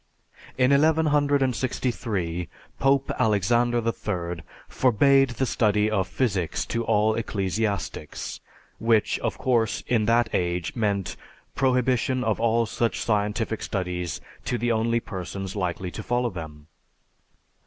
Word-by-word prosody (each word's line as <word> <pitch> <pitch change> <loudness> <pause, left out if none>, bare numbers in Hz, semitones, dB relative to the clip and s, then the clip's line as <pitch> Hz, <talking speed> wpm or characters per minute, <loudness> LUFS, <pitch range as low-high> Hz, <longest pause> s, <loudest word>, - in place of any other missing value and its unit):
In 130 +1 +4
1163 135 - +1 0.3
Pope 135 0 +2
Alexander 120 +4 +2
III 90 -7 -3 0.3
forbade 135 +2 +4
the 130 +2 -1
study 105 -3 +2
of 95 -4 +1
physics 95 -7 -1
to 115 0 -2
all 110 -1 +2
ecclesiastics, 100 -6 -3 0.4
which 115 -2 +2
of - - -2
course, 120 -4 +1
in 115 -3 +1
that 115 +1 +3
age, 90 -1 -1
meant 100 -5 -1 0.4
prohibition 130 -1 +1
of 110 -2 0
all 115 0 +2
such 115 +2 -1
scientific 105 +1 0
studies 90 -4 -3 0.3
to 120 - -1
the 120 +1 0
only 115 +1 +1
persons 95 -2 -6
likely 90 -2 -2
to 110 - -6
follow 120 +2 0
them. 80 -4 -8
110 Hz, 115 wpm, -25 LUFS, 95-125 Hz, 0.4 s, In